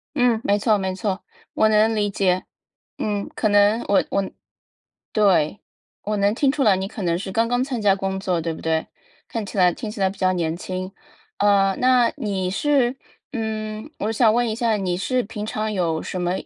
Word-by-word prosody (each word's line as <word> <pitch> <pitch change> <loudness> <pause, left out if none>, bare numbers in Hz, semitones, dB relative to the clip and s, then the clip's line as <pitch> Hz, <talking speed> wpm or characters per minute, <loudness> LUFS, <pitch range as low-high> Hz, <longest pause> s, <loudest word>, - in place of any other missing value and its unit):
嗯， 245 -4 +3
没 205 +1 +2
错， 215 -1 +3
没 190 -1 -2
错， 195 +1 -3 0.3
我 220 - +3
能 220 +1 +3
理 205 -1 +1
解。 185 -2 +1 0.5
嗯， 205 -1 -2
可 215 - +1
能， 205 +3 +4
我 200 - +4
我 195 -1 0 0.8
对， 195 -5 +2 0.4
我 210 +1 -2
能 200 +2 +2
听 270 +1 +2
出 290 - -1
来 210 -6 +5
你 190 +1 -3
可 215 +2 -8
能 170 -1 +1
是 190 +1 -6
刚 230 +3 +1
刚 245 +1 +1
参 260 -4 -3
加 200 -2 +3
工 190 0 -3
作， 180 -4 -1
对 165 0 -2
不 - - -9
对？ 160 0 0 0.4
看 225 -3 -4
起 200 - -8
来 180 -2 +5
听 220 +4 -6
起 210 -1 -8
来 190 -1 +3
比 195 - -12
较 185 -1 +2
年 165 -2 -1
轻。 185 +2 -5 0.5
啊， 195 -1 +3
那 250 -2 +4
你 190 -4 -2
是 260 +3 +2 0.4
嗯， 220 0 -4
我 215 - -1
想 225 -1 +4
问 240 0 +2
一 220 - -1
下， 230 -1 +1
你 180 -3 -1
是 250 +6 0
平 210 -1 -6
常 215 0 -2
有 170 -5 -1
什 185 - -4
么， 175 0 0
205 Hz, 220 characters per minute, -22 LUFS, 190-225 Hz, 0.8 s, 来